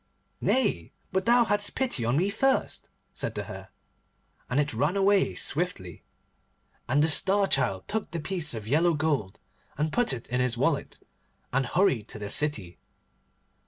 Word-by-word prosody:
'Nay, 260 0 0 0.2
but 190 +2 -1
thou 240 0 +5
hadst 205 -1 -1
pity 245 - 0
on 120 +4 +1
me 190 +5 +1
first,' 270 +6 0 0.2
said - - -4
the - - -3
Hare, - - -9 0.8
and 125 - +1
it 145 -2 0
ran 145 - 0
away 195 0 +3
swiftly. 140 - -3 0.9
And 145 +4 +3
the - - +3
Star 195 +5 +4
Child 95 - 0
took 220 -1 -3
the 170 - -4
piece 160 -4 -2
of 110 -1 -7
yellow 160 +6 +3
gold, 145 -11 -1 0.4
and 150 +2 -1
put 245 -1 +2
it 125 -3 -5
in 125 +1 0
his 125 -2 0
wallet, 140 +3 -1 0.5
and 135 -1 +1
hurried 135 - +1
to - - -9
the 105 -1 -6
city. 105 - 0
150 Hz, 160 wpm, -27 LUFS, 125-195 Hz, 0.9 s, thou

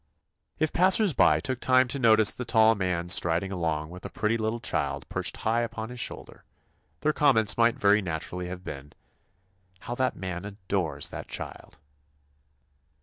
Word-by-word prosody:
If 155 0 -1
passers 190 +1 +4
by - - +4
took 130 -2 -4
time 130 0 +3
to 140 - -3
notice 110 -3 +5
the 125 - -6
tall 110 -1 +4
man 90 -4 -2
striding 85 +1 +1
along 80 -3 -2
with 90 +1 -11
a - - -6
pretty 110 +1 -1
little 110 +1 -2
child 70 - -3
perched - - -2
high 115 +2 0
upon 115 -1 -5
his 125 0 -8
shoulder, - - -6 0.6
their 155 - +1
comments 125 -9 +4
might 115 0 +3
very 105 +1 +3
naturally 90 +1 -4
have 90 0 -8
been, 70 -6 -9 0.9
"How 120 - -5
that 130 +1 -1
man 90 -1 -5
adores 90 -7 -3
that - - -8
child!" 75 - -7
105 Hz, 160 wpm, -27 LUFS, 90-120 Hz, 0.9 s, notice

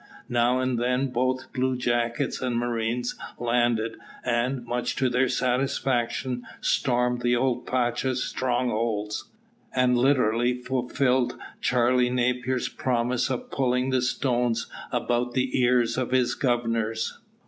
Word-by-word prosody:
Now 120 +1 +2
and 130 -2 0
then 125 +2 +1
both 130 +1 -1
bluejackets 125 -1 0
and 125 -2 -1
marines 120 0 -1 0.2
landed, 120 -2 +1 0.3
and, 125 +1 0
much 120 +1 -2
to 130 -2 +1
their 125 +1 +2
satisfaction, 125 -1 0 0.2
stormed 125 -2 +1
the 120 0 +2
old 125 0 0
pacha's 125 +1 0
strongholds, 115 -4 -1 0.5
and 125 -1 +3
literally 125 -2 +3
fulfilled 125 0 0 0.2
Charley 125 0 +3
Napier's 125 0 0
promise 125 +1 0
of 130 -2 -4
pulling 130 0 +1
the 130 -1 +2
stones 120 -2 0 0.3
about 120 0 0
the 130 0 +1
ears 120 -1 +3
of 130 - -1
his 125 -1 +2
governors. 115 -3 -1
125 Hz, 115 wpm, -26 LUFS, 120-130 Hz, 0.5 s, and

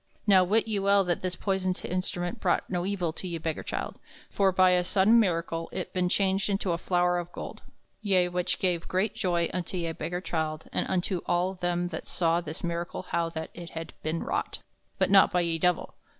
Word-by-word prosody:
Now 195 -3 +6
wit 215 +5 +2
ye 215 -2 0
well 200 0 +4
that 175 -2 -1
this 185 -1 -2
poyson 190 -2 0
instrument 175 -1 -2
brought - - +1
no 175 -1 -1
evill 180 -5 -1
to 185 - -7
ye 170 -2 -3
beggar 160 -1 -3
childe, - - -4 0.3
for 195 -1 +3
by 185 0 +5
a 180 0 +3
sodaine 205 +5 +4
miracle 165 -4 0
it 185 - -4
ben 180 -1 +1
changed 195 +1 +1
into 195 -2 0
a 170 - -1
flowre 180 0 +2
of 175 0 -11
gold, - - -7 0.4
ye 190 -4 +3
which 180 0 -1
gave 175 -3 0
great 190 +4 0
joy 170 -2 0
unto 180 0 -3
ye 170 -2 -1
beggar 175 +2 -4
childe 160 -3 -3
and - - 0
unto 185 -1 0
all 180 +2 +1
them 175 -1 -1
that 160 - -6
saw 170 0 +1
this 160 -2 -6
miracle 170 +1 -3
how 170 -1 +1
that 160 -1 -6
it 170 -1 -8
had 165 - -6
ben 160 +1 -2
wrought, - - -2 0.4
but - - +2
not 195 -1 +7
by 180 - +2
ye 165 -1 0
Divell. 180 0 +1
180 Hz, 205 wpm, -28 LUFS, 170-190 Hz, 0.4 s, not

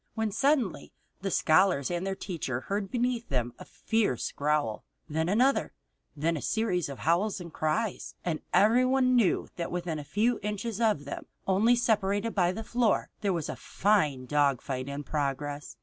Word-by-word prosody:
Then 220 -1 0
suddenly 270 - +1 0.3
the 195 - -2
scholars 170 -3 +3
and 175 +2 -2
the 195 - -1
teacher 150 -11 -4
heard 200 +3 -3
beneath 245 +1 -1
them 120 -3 -1
a - - -9
fierce 220 - -1
growl, 145 -7 0 0.2
then 160 +2 -1
another, 255 +7 +2 0.4
then 160 +3 0
a 150 - -4
series 185 -8 0
of 140 - -6
howls 185 +6 +1
and 170 -3 -9
cries. 190 +7 -2
And 165 -3 -1
everyone 255 +4 +4
knew 230 -6 +2
that 170 - -3
within 175 -3 -3
a - - -6
few 215 +11 +1
inches 210 +2 -3
of 210 -11 +2
them, 140 - -6 0.2
only 210 +6 +4
separated 215 -2 +1
by 180 -3 +2
the 220 +4 -5
floor, 235 -1 +1
there 200 -2 +1
was 170 -4 -2
a - - -4
fine 155 -11 +1
dogfight 140 -2 0
in 140 +1 -5
progress. 145 0 -3
185 Hz, 165 wpm, -29 LUFS, 150-220 Hz, 0.4 s, everyone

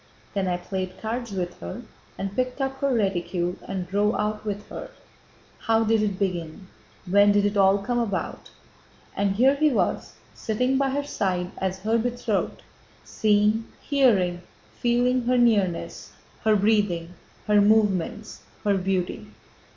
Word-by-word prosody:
Then 195 -2 -1
I 180 -1 0
played 185 +1 -5
cards 235 +1 -4
with 180 -2 -4
her 85 +1 -7 0.3
and 195 0 -4
picked 255 +1 -1
up 270 0 -2
her 280 0 +1
reticule 180 -5 -1
and 185 -2 -4
drove 205 +3 +1
out 210 0 -2
with 205 -1 -4
her. - - -7 0.7
How 225 0 +2
did 225 0 +2
it 205 -3 -1
begin, 185 -1 -3 0.4
when 205 +2 +5
did 205 0 +3
it 205 0 0
all 195 0 +5
come 240 +5 -1
about?" 205 -5 -3 0.7
And 200 -1 0
here 260 +6 +5
he 305 +2 +3
was 245 - -1 0.2
sitting 250 +5 0
by 275 -1 +2
her 285 +2 -1
side 185 -9 -2
as 190 0 -1
her 225 +3 +1
betrothed, 240 -3 -2 0.4
seeing, 215 +1 +2
hearing, 200 - +2 0.3
feeling 245 +1 +1
her 250 +1 +2
nearness, 210 -8 +1 0.3
her 215 -1 +5
breathing, 200 -5 +1 0.3
her 210 -1 +4
movements, 210 -1 +1 0.2
her 200 -2 +2
beauty. 185 - -2
205 Hz, 145 wpm, -25 LUFS, 190-235 Hz, 0.7 s, when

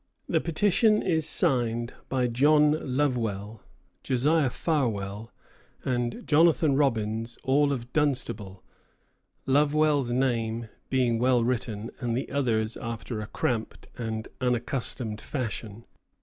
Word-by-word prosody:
The - - +1
petition 205 +6 +3
is 160 -4 0
signed 120 -2 0 0.2
by 130 -2 +1
John 150 +2 +3
Lovewell, 115 -7 -1 0.4
Josiah 140 +3 +2
Farwell, 115 - -2 0.5
and 120 -2 -2
Jonathan 160 -2 +4
Robbins, 115 -4 0
all 140 +2 +3
of 125 -3 -4
Dunstable, 125 -10 -1 0.8
Lovewell's 145 -1 +3
name 115 -3 0 0.2
being 125 -3 +2
well 125 -1 +3
written, 115 -3 -2
and 120 -2 -1
the 130 - -4
others 115 -6 0
after 115 -1 -5
a 105 - -6
cramped 115 -1 -3
and 110 -1 -4
unaccustomed 125 -3 -2
fashion. 115 -4 -5
125 Hz, 105 wpm, -27 LUFS, 115-140 Hz, 0.8 s, Jonathan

